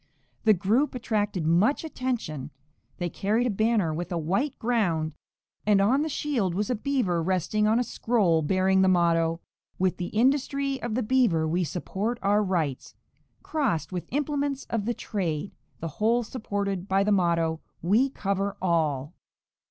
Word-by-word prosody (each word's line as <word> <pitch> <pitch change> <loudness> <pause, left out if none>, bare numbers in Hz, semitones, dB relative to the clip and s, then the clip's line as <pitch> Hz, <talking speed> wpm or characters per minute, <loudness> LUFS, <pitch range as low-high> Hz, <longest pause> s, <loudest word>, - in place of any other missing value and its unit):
The 215 -1 +6
group 225 +10 +1
attracted 205 -7 -1
much 185 - +3
attention; 240 - -3 0.5
they 175 - -2
carried 210 +7 0
a 245 - +1
banner 215 -5 +1
with 175 +3 -4
a 175 - -1
white 195 - -1
ground, 175 -10 0 0.5
and 205 -1 +4
on 240 +8 +3
the 315 - -1
shield 245 - -1
was 205 +4 -1
a - - +1
beaver 220 -8 0
resting 190 +4 +1
on 220 +2 +3
a 245 - +2
scroll 210 -9 +1
bearing 190 +4 +2
the 190 - +4
motto: 165 -2 +2 0.4
'With 185 -1 +1
the 175 - -3
industry 275 +4 +1
of 235 -2 -3
the 250 - 0
beaver 215 -10 +2
we 175 +3 +1
support 195 - -3
our 205 +1 +3
rights,' 165 -9 -2 0.5
crossed 275 - -1
with 180 -2 -4
implements 285 -1 -1
of 225 -3 -1
the 240 +1 -1
trade, 185 -4 -3 0.3
the 165 - -2
whole 230 +3 +3
supported 200 -5 -3
by 195 0 +2
the 210 - +1
motto: 170 -4 +2 0.2
'We 220 +10 +3
cover 200 -4 -2
all.'" 155 -5 0
200 Hz, 160 wpm, -26 LUFS, 175-240 Hz, 0.5 s, The